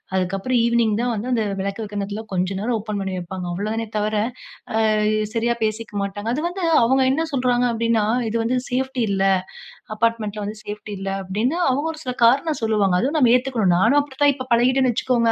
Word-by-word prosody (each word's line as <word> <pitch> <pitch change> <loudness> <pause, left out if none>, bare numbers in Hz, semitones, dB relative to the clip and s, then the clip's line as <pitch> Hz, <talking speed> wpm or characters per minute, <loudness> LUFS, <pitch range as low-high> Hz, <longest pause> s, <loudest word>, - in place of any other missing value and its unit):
அதுக்கப்பறம் 195 +7 0
ஈவ்னிங் 235 -2 +2
தான் 245 0 0
வந்து 220 +2 -4
அந்த 225 -3 +1 0.2
விளக்கு 200 +3 -3
வைக்கிற 205 -1 -6
நேரத்தில 205 +2 -4
கொஞ்சம் 185 +1 -1
நேரம் 235 +3 -1
ஓப்பன் 210 -1 -4
பண்ணி 190 -1 -3
வைப்பாங்க. 180 +1 -6
அவ்ளோதானே 215 +4 -3
தவிர, 215 +1 0 0.8
அ - - +1 0.4
சரியா 235 +1 +1
பேசிக்க 215 0 -3
மாட்டாங்க. 205 +2 -4
அது 300 - -2
வந்து 365 +1 -5 0.2
அவங்க 265 +3 +3
என்ன 320 +4 0
சொல்றாங்க 250 -1 +2
அப்படின்னா, 230 -1 +1 0.2
இது 230 - -1
வந்து 250 +2 0
சேஃப்டி 260 0 -1
இல்ல. 195 0 +1 0.7
அப்பார்ட்மெண்ட்டுல 215 -2 -1
வந்து 210 +1 -5
சேஃப்டி 210 0 -7
இல்ல 195 0 -4
அப்படின்னு, 220 - -1
அவங்க 285 +5 -1
ஒரு 310 - -11
சில 250 - -2
காரணம் 280 +4 +2
சொல்லுவாங்க. 205 -5 +2
அதுவும் 280 +6 0
நம்ம 245 -3 +5
ஏத்துக்கணும். 240 -8 +1
நானும் 280 +10 +4
அப்படித்தான் 285 0 +1
இப்ப 260 -1 -7
பழகிட்டேன்னு 255 +2 +3
வச்சுக்கோங்க. 235 0 +1
230 Hz, 185 wpm, -22 LUFS, 205-255 Hz, 0.8 s, நம்ம